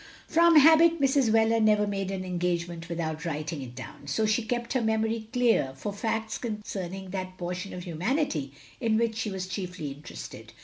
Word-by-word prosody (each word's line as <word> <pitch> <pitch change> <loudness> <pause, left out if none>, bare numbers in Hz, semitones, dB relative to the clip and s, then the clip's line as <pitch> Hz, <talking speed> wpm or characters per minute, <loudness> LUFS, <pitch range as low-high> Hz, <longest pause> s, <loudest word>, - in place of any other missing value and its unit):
From 335 0 +5
habit 325 +2 +7
Mrs. 275 -3 +3
Wheler 225 +1 +4
never 210 -1 +4
made 195 -2 -2
an 190 -1 -3
engage 175 -1 -1
ment 170 -1 -8
without 160 -2 -3
writing 155 -1 -3
it 125 -2 -8
down; 130 +2 -10
so 180 +11 +1
she 215 +2 +2
kept 240 +1 -2
her 255 - +1
memory 220 0 0
clear 240 - +2
for 205 +9 -4
facts 220 +1 -2
concerning 195 -4 -5
that 185 -1 -5
portion 180 +2 -4
of 180 - -6
humanity 175 - -1 0.3
in 225 -4 +2
which 230 -1 +1
she 225 -1 -2
was 190 -2 -4
chiefly 180 -5 -5
interested. 135 - -9
200 Hz, 180 wpm, -28 LUFS, 175-225 Hz, 0.3 s, habit